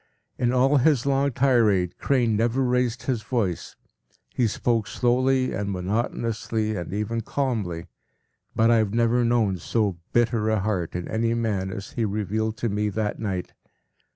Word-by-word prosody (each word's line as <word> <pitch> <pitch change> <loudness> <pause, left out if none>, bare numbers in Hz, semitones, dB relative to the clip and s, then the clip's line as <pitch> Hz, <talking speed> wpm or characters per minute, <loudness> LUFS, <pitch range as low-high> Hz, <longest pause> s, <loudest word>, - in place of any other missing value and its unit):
In 120 -1 +2
all 130 +3 +3
his 135 -2 +3
long 140 0 +2
tirade, 115 -9 +2
Crane 120 -5 +2
never 120 +4 +1
raised 125 -1 0
his 125 -5 -1
voice; 105 -6 -2 0.6
he 120 - +2
spoke 115 0 0
slowly 130 +4 +1
and 100 0 -2
monotonously 110 +2 -2
and 90 - -5
even 105 +3 -2
calmly, 110 -10 -2 0.7
but 115 +1 +4
I 115 - +5
have 110 -1 0
never 120 +1 +3
known 115 -5 +2
so 100 -1 -1
bitter 115 -2 +2
a 110 -1 +2
heart 95 -6 -2
in 90 -1 -3
any 115 +1 0
man 105 -5 -1
as 100 -1 -7
he 115 - -2
revealed 110 +1 -1
to 120 - -1
me 105 +1 0
that 105 +1 -2
night. 95 -5 -3
115 Hz, 155 wpm, -25 LUFS, 105-120 Hz, 0.7 s, I